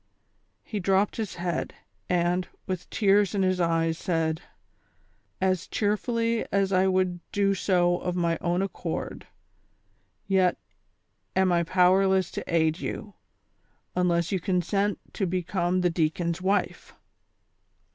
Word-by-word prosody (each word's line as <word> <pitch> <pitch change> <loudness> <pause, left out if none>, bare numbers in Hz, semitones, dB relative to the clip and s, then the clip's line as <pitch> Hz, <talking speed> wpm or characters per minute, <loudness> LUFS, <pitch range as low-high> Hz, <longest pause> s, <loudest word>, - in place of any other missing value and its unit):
He 210 - -4
dropped 195 +2 +1
his 220 -4 -3
head, 175 -1 -3 0.3
and, 180 0 +1 0.2
with 185 -1 -4
tears 205 -1 +3
in 195 - +2
his 185 -1 +1
eyes, 165 -1 +1
said: 165 -2 -1 0.5
" - - -39 0.2
As 185 -1 0
cheerfully 230 +2 0
as 195 -1 +1
I 185 +1 +4
would 185 -1 +1
do 200 -1 +2
so 175 -2 +2
of 180 -1 -3
my 170 -2 0
own 175 +2 +1
accord; 195 - -5 1.0
yet 190 -2 +2 0.8
am 190 -1 +3
I 170 -1 +3
powerless 185 +1 +3
to - - -4
aid 160 0 +2
you, 205 0 -5 0.8
unless 175 -1 +1
you 190 - +1
consent 195 +3 0 0.2
to 195 - -1
become 180 0 0
the 180 -1 +2
deacon's 165 +1 -1
wife." 195 +2 -1
185 Hz, 125 wpm, -27 LUFS, 175-195 Hz, 1.0 s, I